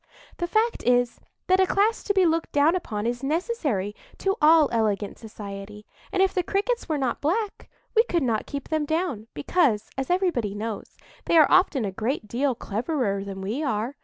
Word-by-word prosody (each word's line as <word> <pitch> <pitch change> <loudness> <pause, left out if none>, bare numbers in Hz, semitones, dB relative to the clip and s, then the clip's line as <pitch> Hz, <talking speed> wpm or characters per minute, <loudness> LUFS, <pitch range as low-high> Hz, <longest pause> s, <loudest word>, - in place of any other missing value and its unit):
The 345 - -2
fact 445 +5 +1
is, 245 0 +2 0.3
that 370 +1 +3
a 380 - +4
class 420 +4 +1
to 405 - +1
be 380 -2 +5
looked 330 0 0
down 290 +4 +4
upon 215 - -3
is 240 +1 -2
necessary 285 - -1 0.2
to 390 0 0
all 310 0 +6
elegant 210 -3 -1
society; 210 -1 -9 0.3
and 380 - +3
if 385 - +1
the 365 - +1
Crickets 410 +5 -1
were 310 - +1
not 260 -4 -1
black, 400 +8 -2 0.3
we 450 - +6
could 340 -8 0
not 225 -4 -1
keep 280 -2 -6
them 310 -1 0
down, 315 - -2
because, 215 - +1
as 270 - -3
everybody 345 - 0
knows, 215 0 -6 0.3
they 335 - +3
are 310 - +6
often 345 - +4
a 195 - -2
great 225 +3 -3
deal 255 +4 0
cleverer 220 -3 -2
than 195 -1 -7
we 215 +9 -3
are. 235 -1 -2
280 Hz, 190 wpm, -25 LUFS, 215-355 Hz, 0.3 s, all